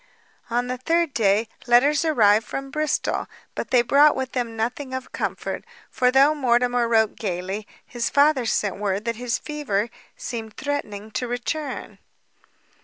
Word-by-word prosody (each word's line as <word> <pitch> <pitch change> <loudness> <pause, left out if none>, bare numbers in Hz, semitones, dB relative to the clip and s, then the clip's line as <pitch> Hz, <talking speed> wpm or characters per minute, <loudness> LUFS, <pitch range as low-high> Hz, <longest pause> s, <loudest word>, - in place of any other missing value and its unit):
On 240 +1 0
the 250 0 -4
third 330 +2 +1
day, 215 0 +2 0.2
letters 280 +6 +4
arrived 225 -9 +4
from 270 0 -5
Bristol; 305 0 -1 0.3
but - - -5
they 245 -2 +4
brought 290 +4 +5
with 265 -1 -3
them 235 -3 -3
nothing 255 +4 -3
of 260 -1 -6
comfort, - - -3 0.3
for 250 -1 +2
though 275 +4 +5
Mortimer 245 -3 +2
wrote 220 -2 +2
gaily, 190 +1 -4 0.2
his 240 -2 -2
father 285 -4 +3
sent 205 -3 0
word 200 +1 -2
that 230 -1 -2
his 245 -1 -1
fever 240 -8 -2 0.3
seemed 225 -3 -6
threatening 220 -8 -4
to 250 - -2
return. 260 +4 -4
245 Hz, 150 wpm, -23 LUFS, 220-280 Hz, 0.3 s, brought